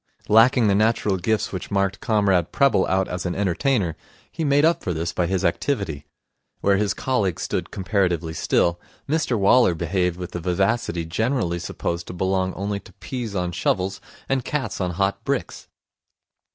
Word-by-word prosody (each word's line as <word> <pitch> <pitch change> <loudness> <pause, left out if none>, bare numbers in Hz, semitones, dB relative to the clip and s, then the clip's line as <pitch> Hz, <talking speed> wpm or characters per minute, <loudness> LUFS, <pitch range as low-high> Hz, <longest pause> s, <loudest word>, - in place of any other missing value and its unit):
Lacking 115 +2 +5
the 100 - +4
natural 105 -1 +2
gifts 110 +4 0
which 95 - -5
marked 100 -1 0
Comrade 100 -6 +2
Prebble 140 -9 +3
out 95 0 +1
as 90 +1 -3
an 90 - -3
entertainer, 100 - 0 0.4
he 165 - -4
made 145 0 +4
up 170 +1 +2
for 90 - -2
this 85 +2 -2
by 90 - 0
his 95 0 0
activity. 85 - -1 0.5
Where 100 0 +3
his 105 0 0
colleagues 105 -10 -1
stood - - -2
comparatively 90 -5 -1
still, 85 +2 +1 0.3
Mr 150 -5 +1
Waller 100 -1 +4
behaved 90 +1 -1
with 90 -1 -6
the 85 - -4
vivacity 90 0 0
generally 105 0 -1
supposed 85 +1 -4
to - - -6
belong 95 +1 0
only 100 +1 -2
to - - -17
peas 120 -6 -6
on 90 -1 -1
shovels 95 +2 -1 0.3
and 135 -1 0
cats 130 -7 -3
on 90 - 0
hot 95 +2 -1
bricks. - - -3
95 Hz, 165 wpm, -23 LUFS, 90-110 Hz, 0.5 s, Lacking